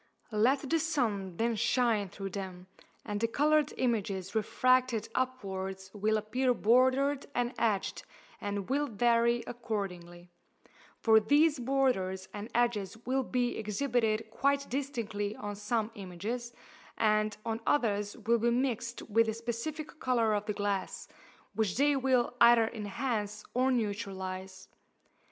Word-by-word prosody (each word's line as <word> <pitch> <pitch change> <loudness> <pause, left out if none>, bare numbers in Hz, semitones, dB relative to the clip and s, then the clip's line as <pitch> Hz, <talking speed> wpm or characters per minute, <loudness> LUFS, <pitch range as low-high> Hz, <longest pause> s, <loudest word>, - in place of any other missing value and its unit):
Let 260 +7 +2
the 330 +4 +2
sun 220 - -1
then 230 0 +1
shine 225 -3 +1
through 195 +1 -6
them, 185 -2 -6 0.4
and 205 -2 -3
the 230 - +3
coloured 300 +4 +2
images 200 -7 -1
refracted 255 +1 +2
upwards 190 -7 -3
will 215 +1 +1
appear 250 +4 0
bordered 260 +5 +3
and 245 +1 0
edged, 210 -4 0 0.4
and 200 -1 -3
will 290 +3 +1
vary 235 +1 +2
accordingly: 180 -7 -5 0.7
for 220 -1 +5
these 290 +6 +3
borders 235 -8 0
and 210 +2 -6
edges 230 -4 +1
will 265 +2 +1
be 245 -1 -1
exhibited 220 0 0
quite 280 +3 +1
distinctly 230 -7 -3
on 205 0 -5
some 215 +2 -1
images, 210 +6 -5 0.5
and 215 -1 +2
on 225 0 -2
others 210 -6 +1
will 230 +1 +1
be 235 +2 +2
mixed 240 -1 -1
with 230 +1 +2
the 220 - -1
specific 265 +8 -5
colour 235 -4 +2
of 205 0 -1
the 210 - 0
glass, 200 -2 -2 0.5
which 210 -3 0
they 285 +1 +4
will 255 -3 +2
either 235 -1 +7
enhance 210 -1 -3
or 255 +2 +2
neutralize. 190 -4 -3
225 Hz, 130 wpm, -31 LUFS, 205-255 Hz, 0.7 s, either